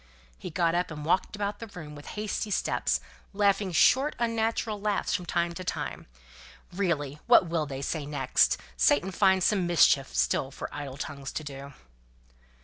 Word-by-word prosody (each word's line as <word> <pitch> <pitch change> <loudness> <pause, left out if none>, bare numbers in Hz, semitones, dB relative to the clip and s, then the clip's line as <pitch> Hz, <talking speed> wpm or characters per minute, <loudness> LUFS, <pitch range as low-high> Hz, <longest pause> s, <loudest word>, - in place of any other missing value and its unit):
He - - -6
got 165 0 +1
up 175 +1 0
and 150 -2 -7
walked 185 +5 +1
about 205 0 -3
the 230 - -7
room 160 -7 -9
with 145 0 -11
hasty 210 0 -2
steps, - - 0 0.3
laughing 200 -1 +2
short 265 - +4
unnatural 225 -2 -1
laughs 210 -1 0
from 180 -3 -2
time 170 0 0
to 185 - -7
time. - - -4 0.7
"Really 155 -7 -1
what 235 -5 +7
will 165 -2 -1
they 135 -1 -5
say 150 0 -3
next? 145 -3 +2 0.2
'Satan 145 - +3
finds 190 -1 +3
some 195 -5 +2
mischief 145 -5 +4
still 135 - +1
for 140 - -7
idle 140 -2 -6
tongues 140 -2 -6
to 155 - -4
do.'" 140 -1 -8
175 Hz, 165 wpm, -28 LUFS, 145-200 Hz, 0.7 s, what